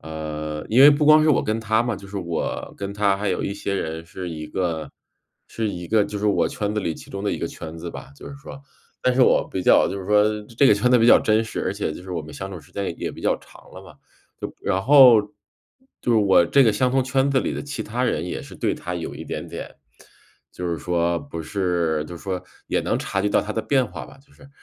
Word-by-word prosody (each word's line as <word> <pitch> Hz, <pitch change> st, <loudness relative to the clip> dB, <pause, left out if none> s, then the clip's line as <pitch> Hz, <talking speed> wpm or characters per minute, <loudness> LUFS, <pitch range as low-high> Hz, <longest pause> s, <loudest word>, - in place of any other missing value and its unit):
呃， 75 Hz, -1 st, -5 dB
因 120 Hz, +4 st, +4 dB
为 145 Hz, -, +10 dB
不 150 Hz, +1 st, +2 dB
光 155 Hz, 0 st, +7 dB
是 155 Hz, -, +4 dB
我 135 Hz, -, +3 dB
跟 110 Hz, +1 st, -1 dB
他 110 Hz, 0 st, +1 dB
嘛， 120 Hz, -1 st, -1 dB
就 100 Hz, 0 st, -11 dB
是 100 Hz, -, -7 dB
我 85 Hz, -3 st, -4 dB
跟 100 Hz, 0 st, -5 dB
他 100 Hz, -1 st, +1 dB
还 100 Hz, 0 st, -2 dB
有 90 Hz, -, -1 dB
一 100 Hz, -, -3 dB
些 100 Hz, -1 st, -4 dB
人 80 Hz, -2 st, -4 dB
是 90 Hz, +1 st, -7 dB
一 75 Hz, -2 st, -7 dB
个 80 Hz, -5 st, -3 dB, 0.6 s
是 110 Hz, -2 st, -3 dB
一 90 Hz, -3 st, -6 dB
个 105 Hz, 0 st, +3 dB
就 105 Hz, 0 st, -5 dB
是 105 Hz, -, -1 dB
我 105 Hz, -, +2 dB
圈 105 Hz, 0 st, -3 dB
子 105 Hz, -, 0 dB
里 85 Hz, -4 st, -2 dB
其 -, -, -12 dB
中 100 Hz, 0 st, -6 dB
的 105 Hz, -, 0 dB
一 -, -, -3 dB
个 -, -, -2 dB
圈 80 Hz, 0 st, -8 dB
子 85 Hz, +1 st, -6 dB
吧， 70 Hz, -, -10 dB
就 -, -, -10 dB
是 140 Hz, -, -9 dB
说。 140 Hz, 0 st, -11 dB, 0.4 s
但 125 Hz, -, +2 dB
是 130 Hz, -, +4 dB
我 -, -, +3 dB
比 95 Hz, -, -3 dB
较 -, -, +5 dB
就 100 Hz, -, -4 dB
是 95 Hz, -, -8 dB
说 105 Hz, +1 st, +4 dB, 0.3 s
这 140 Hz, -, +6 dB
个 105 Hz, -, +6 dB
圈 115 Hz, +5 st, +1 dB
子 125 Hz, -, +6 dB
比 115 Hz, -, +4 dB
较 -, -, +8 dB
真 110 Hz, +1 st, +2 dB
实， 110 Hz, -, -5 dB
而 95 Hz, -, -1 dB
且 100 Hz, -6 st, -3 dB
就 90 Hz, -, -9 dB
是 95 Hz, -, -10 dB
我 85 Hz, -, -2 dB
们 80 Hz, 0 st, -10 dB
相 95 Hz, +1 st, -6 dB
处 95 Hz, -, -7 dB
时 75 Hz, -, -19 dB
间 100 Hz, -, -3 dB
也 -, -, -2 dB
也 -, -, -5 dB
比 -, -, -11 dB
较 -, -, +2 dB
长 -, -, -18 dB
了 -, -, -10 dB
嘛， -, -, -14 dB, 0.5 s
就 -, -, -5 dB
然 95 Hz, +1 st, -1 dB
后 130 Hz, -4 st, +8 dB, 0.8 s
就 120 Hz, -, -1 dB
是 -, -, +4 dB
我 95 Hz, -4 st, +5 dB
这 135 Hz, +10 st, +4 dB
个 110 Hz, -, +4 dB
相 125 Hz, +5 st, +1 dB
同 130 Hz, 0 st, +1 dB
圈 135 Hz, +1 st, +1 dB
子 135 Hz, -, +3 dB
里 -, -, -1 dB
的 -, -, -4 dB
其 145 Hz, -5 st, -6 dB
他 120 Hz, +3 st, -3 dB
人 85 Hz, -10 st, 0 dB
也 -, -, -5 dB
是 -, -, -12 dB
对 -, -, 0 dB
他 90 Hz, 0 st, -5 dB
有 85 Hz, -, -5 dB
一 -, -, -8 dB
点 -, -, -5 dB
点 -, -, -8 dB, 0.7 s
就 90 Hz, -, -6 dB
是 85 Hz, -, -1 dB
说 85 Hz, 0 st, 0 dB
不 140 Hz, -12 st, -7 dB
是 85 Hz, -3 st, -1 dB
就 85 Hz, -, -8 dB
说 95 Hz, +1 st, -4 dB, 0.2 s
也 -, -, 0 dB
能 -, -, -1 dB
察 95 Hz, 0 st, -2 dB
觉 105 Hz, -, +1 dB
到 -, -, +3 dB
他 105 Hz, -, -5 dB
的 110 Hz, -, -2 dB
变 130 Hz, -3 st, +2 dB
化 -, -, -8 dB
吧， -, -, -16 dB
就 140 Hz, +1 st, -25 dB
是。 135 Hz, -, -17 dB
100 Hz, 290 characters per minute, -23 LUFS, 85-120 Hz, 0.8 s, 为